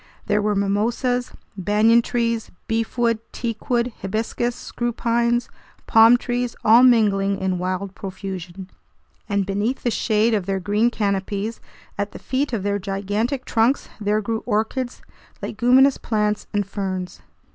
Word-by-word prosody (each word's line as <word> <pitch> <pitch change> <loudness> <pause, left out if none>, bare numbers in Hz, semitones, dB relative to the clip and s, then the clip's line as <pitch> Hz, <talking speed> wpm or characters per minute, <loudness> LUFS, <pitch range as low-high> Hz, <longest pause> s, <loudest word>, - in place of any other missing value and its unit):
There 210 0 +1
were 210 0 +1
mimosas, 230 +5 0 0.2
banyan 210 +5 +4
trees, 230 -1 -1 0.2
beefwood, 230 0 0
teakwood, 235 +1 -2
hibiscus, 225 +4 -2
screw 240 0 -3
pines, 235 +1 +1 0.4
palm 225 +2 +7
trees, 245 -1 -2
all 225 +2 +7
mingling 205 -5 +4
in 190 -2 -1
wild 185 +2 -3
profusion; 190 -1 -7 0.6
and 200 -1 +1
beneath 205 +7 -2
the 240 - +1
shade 220 +1 +2
of 200 -4 0
their 195 -1 0
green 205 +5 +2
canopies, 205 0 -2 0.4
at 205 0 -2
the - - -7
feet 270 +2 -2
of 220 -5 -2
their 205 0 0
gigantic 205 +7 -2
trunks, 235 +4 +1
there 210 +1 +1
grew 225 +1 -2
orchids, 240 +3 -1 0.4
leguminous 255 +5 +3
plants, 210 -2 -1
and 205 -1 0
ferns. 185 -2 -4
215 Hz, 135 wpm, -22 LUFS, 200-235 Hz, 0.6 s, palm